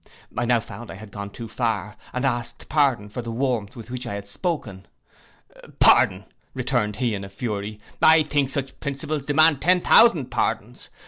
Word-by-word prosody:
I 120 Hz, -, 0 dB
now 120 Hz, 0 st, +3 dB
found 120 Hz, +1 st, -10 dB
I -, -, -7 dB
had 105 Hz, +1 st, -11 dB
gone 100 Hz, -1 st, -6 dB
too 115 Hz, +3 st, -8 dB
far, 110 Hz, -2 st, -2 dB, 0.2 s
and 125 Hz, +2 st, -2 dB
asked 120 Hz, -2 st, -3 dB
pardon 135 Hz, -8 st, +2 dB
for 105 Hz, +4 st, -6 dB
the 115 Hz, -1 st, -6 dB
warmth 120 Hz, -4 st, -2 dB
with 115 Hz, -1 st, -10 dB
which 125 Hz, -1 st, -4 dB
I 100 Hz, -, -4 dB
had 100 Hz, 0 st, -7 dB
spoken. 100 Hz, -, -4 dB, 0.9 s
'Pardon,' -, -, +5 dB, 0.3 s
returned 105 Hz, -1 st, 0 dB
he 120 Hz, -1 st, -1 dB
in 100 Hz, -1 st, -4 dB
a 95 Hz, -, -8 dB
fury: 105 Hz, 0 st, -4 dB, 0.2 s
'I 160 Hz, 0 st, +7 dB
think 145 Hz, -2 st, 0 dB
such 135 Hz, -1 st, -3 dB
principles 140 Hz, 0 st, -4 dB
demand 150 Hz, -1 st, +4 dB
ten 180 Hz, +2 st, +4 dB
thousand 175 Hz, -, +5 dB
pardons. -, -, -2 dB
120 Hz, 180 wpm, -23 LUFS, 105-140 Hz, 0.9 s, I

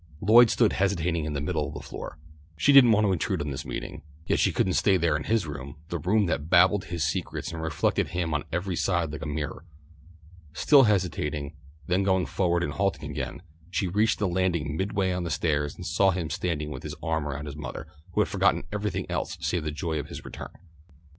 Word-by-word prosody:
Lloyd 115 Hz, +5 st, +7 dB
stood 115 Hz, -1 st, +3 dB
hesitating 90 Hz, -4 st, 0 dB
in 75 Hz, -, -3 dB
the 70 Hz, -, -2 dB
middle 75 Hz, -1 st, -1 dB
of -, -, -8 dB
the -, -, -5 dB
floor. -, -, -8 dB, 0.4 s
She 140 Hz, -, +4 dB
didn't 130 Hz, -4 st, +8 dB
want 105 Hz, 0 st, +4 dB
to 100 Hz, -, +2 dB
intrude 90 Hz, -, -1 dB
on 75 Hz, 0 st, -3 dB
this 65 Hz, -, -5 dB
meeting, -, -, -6 dB, 0.2 s
yet -, -, +1 dB
she -, -, +3 dB
couldn't 95 Hz, -, +1 dB
stay 95 Hz, 0 st, +3 dB
there 85 Hz, -3 st, +1 dB
in 75 Hz, -, -3 dB
his 110 Hz, -5 st, +1 dB
room, 70 Hz, -2 st, -7 dB
the 85 Hz, -, -3 dB
room 100 Hz, +6 st, +2 dB
that 80 Hz, -3 st, -2 dB
babbled 95 Hz, +2 st, +5 dB
his 85 Hz, -1 st, -3 dB
secrets 80 Hz, +4 st, -2 dB
and 80 Hz, -, -5 dB
reflected 80 Hz, -2 st, 0 dB
him 85 Hz, -2 st, -2 dB
on 75 Hz, -, 0 dB
every 90 Hz, +2 st, -2 dB
side 85 Hz, -3 st, 0 dB
like 75 Hz, -, -6 dB
a -, -, -4 dB
mirror. 75 Hz, +1 st, -4 dB, 0.9 s
Still 135 Hz, -, +6 dB
hesitating, 80 Hz, -8 st, -1 dB, 0.3 s
then 90 Hz, +4 st, +1 dB
going 95 Hz, -2 st, +2 dB
forward 85 Hz, -2 st, 0 dB
and 70 Hz, -, -2 dB
halting 95 Hz, -3 st, -1 dB
again, -, -, -5 dB, 0.3 s
she 95 Hz, +1 st, -1 dB
reached 105 Hz, +5 st, +2 dB
the 105 Hz, -, 0 dB
landing 85 Hz, -5 st, 0 dB
midway 95 Hz, +1 st, 0 dB
on 90 Hz, 0 st, -2 dB
the 85 Hz, -, -3 dB
stairs 75 Hz, -3 st, 0 dB
and -, -, -9 dB
saw 90 Hz, +6 st, +3 dB
him 85 Hz, -4 st, -2 dB
standing 75 Hz, -4 st, -2 dB
with -, -, -6 dB
his -, -, -6 dB
arm 80 Hz, -2 st, -1 dB
around 75 Hz, +1 st, -4 dB
his 75 Hz, -1 st, -7 dB
mother, 75 Hz, -, -6 dB, 0.3 s
who -, -, +3 dB
had -, -, +2 dB
forgotten -, -, +2 dB
everything 100 Hz, -3 st, -2 dB
else -, -, -3 dB
save 90 Hz, -3 st, -1 dB
the 75 Hz, -, -2 dB
joy 75 Hz, +1 st, -3 dB
of 70 Hz, -, -5 dB
his -, -, -9 dB
return. -, -, -8 dB
85 Hz, 220 wpm, -27 LUFS, 75-95 Hz, 0.9 s, didn't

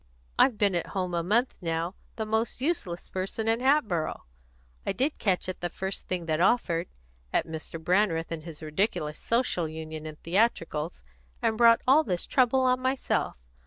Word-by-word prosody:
I've 250 Hz, -5 st, +5 dB
been 205 Hz, -2 st, +3 dB
at 175 Hz, -, -1 dB
home 180 Hz, -1 st, -1 dB
a 170 Hz, -, +1 dB
month 225 Hz, +9 st, +2 dB
now, 165 Hz, +1 st, -1 dB, 0.2 s
the 220 Hz, -, -3 dB
most 220 Hz, +2 st, -1 dB
useless 255 Hz, -, -1 dB
person 195 Hz, +4 st, -3 dB
in 225 Hz, +1 st, +3 dB
Hatboro'. 245 Hz, -, +1 dB, 0.6 s
I -, -, -1 dB
did 270 Hz, +9 st, 0 dB
catch 190 Hz, -4 st, +1 dB
at 185 Hz, -, -5 dB
the 175 Hz, -, -1 dB
first 190 Hz, +3 st, -4 dB
thing 180 Hz, -2 st, -2 dB
that 160 Hz, 0 st, 0 dB
offered 175 Hz, -5 st, +2 dB, 0.4 s
at -, -, +2 dB
Mr. 160 Hz, 0 st, -6 dB
Brandreth 170 Hz, -1 st, +1 dB
and 165 Hz, -1 st, -3 dB
his 160 Hz, -1 st, -10 dB
ridiculous 155 Hz, -1 st, -1 dB
Social 230 Hz, -8 st, 0 dB
Union 155 Hz, 0 st, -6 dB
and 155 Hz, -1 st, -8 dB
theatricals, 165 Hz, -, 0 dB, 0.4 s
and 220 Hz, -, +1 dB
brought 230 Hz, 0 st, +6 dB
all 290 Hz, +4 st, +6 dB
this 180 Hz, -, -2 dB
trouble 260 Hz, 0 st, +3 dB
on 255 Hz, 0 st, +3 dB
myself. 260 Hz, -, 0 dB
185 Hz, 170 wpm, -28 LUFS, 165-230 Hz, 0.6 s, brought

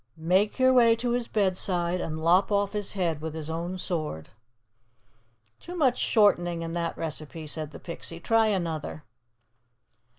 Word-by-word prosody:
"' 115 Hz, -, -40 dB
make 185 Hz, +6 st, +1 dB
your 260 Hz, 0 st, +5 dB
way 235 Hz, -2 st, +6 dB
to 240 Hz, +1 st, -2 dB
his 240 Hz, -1 st, -1 dB
bedside, 185 Hz, -3 st, 0 dB
and 155 Hz, -1 st, -4 dB
lop 170 Hz, +4 st, +3 dB
off 200 Hz, 0 st, +1 dB
his 205 Hz, -1 st, -2 dB
head 170 Hz, -6 st, -1 dB
with 160 Hz, 0 st, -5 dB
his 160 Hz, 0 st, -5 dB
own 170 Hz, +3 st, -3 dB
sword.'" 155 Hz, -, -4 dB, 1.3 s
"Too 355 Hz, -, -8 dB
much 265 Hz, -8 st, +2 dB
shortening 175 Hz, -6 st, +3 dB
in 165 Hz, 0 st, -5 dB
that 170 Hz, -1 st, -2 dB
recipe," 155 Hz, 0 st, -5 dB
said 155 Hz, 0 st, -3 dB
the -, -, -10 dB
Pixie. 170 Hz, -1 st, -7 dB
"Try 225 Hz, +5 st, +3 dB
another." 165 Hz, -6 st, -2 dB
175 Hz, 160 wpm, -27 LUFS, 160-210 Hz, 1.3 s, way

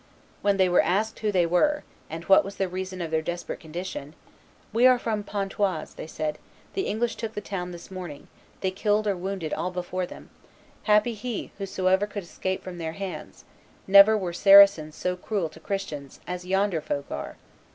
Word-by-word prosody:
When 200 Hz, -1 st, +2 dB
they 190 Hz, -1 st, +4 dB
were 180 Hz, -, +5 dB
asked 215 Hz, +4 st, 0 dB
who 215 Hz, -1 st, 0 dB
they 180 Hz, -3 st, +3 dB
were, 295 Hz, -, +2 dB, 0.3 s
and 165 Hz, +1 st, -6 dB
what 195 Hz, +3 st, +6 dB
was 195 Hz, +1 st, -7 dB
the 195 Hz, -, 0 dB
reason 185 Hz, 0 st, -5 dB
of 165 Hz, -2 st, -4 dB
their 160 Hz, 0 st, +1 dB
desperate 175 Hz, +2 st, -4 dB
condition, 160 Hz, -2 st, -6 dB, 0.6 s
"We 240 Hz, +3 st, +6 dB
are 255 Hz, -1 st, +6 dB
from 225 Hz, -3 st, -2 dB
Pontoise," 195 Hz, -4 st, -2 dB
they -, -, -8 dB
said; 155 Hz, -1 st, -3 dB, 0.3 s
"the 385 Hz, -, -1 dB
English 230 Hz, +2 st, -1 dB
took 225 Hz, -1 st, -5 dB
the -, -, -1 dB
town 195 Hz, -3 st, -4 dB
this 175 Hz, +1 st, -10 dB
morning; 180 Hz, -6 st, -7 dB, 0.3 s
they 190 Hz, -, 0 dB
killed 210 Hz, +2 st, +1 dB
or 200 Hz, -2 st, +1 dB
wounded 185 Hz, -3 st, -4 dB
all 180 Hz, -, -1 dB
before 180 Hz, 0 st, -3 dB
them; -, -, -12 dB, 0.5 s
happy 210 Hz, +2 st, +4 dB
he 225 Hz, +1 st, -5 dB
whosoever 190 Hz, 0 st, +1 dB
could 205 Hz, -1 st, -6 dB
escape 185 Hz, +2 st, -4 dB
from 180 Hz, -2 st, -7 dB
their 160 Hz, -1 st, -3 dB
hands; 195 Hz, +1 st, -7 dB, 0.4 s
never 200 Hz, +3 st, +8 dB
were 180 Hz, -4 st, -3 dB
Saracens 195 Hz, -5 st, +7 dB
so 180 Hz, 0 st, -1 dB
cruel 180 Hz, -2 st, -2 dB
to 160 Hz, -, -15 dB
Christians 160 Hz, -7 st, -5 dB
as 180 Hz, 0 st, -5 dB
yonder 190 Hz, -3 st, +1 dB
folk 140 Hz, -2 st, -4 dB
are." 70 Hz, -, -5 dB
190 Hz, 185 wpm, -26 LUFS, 175-205 Hz, 0.6 s, never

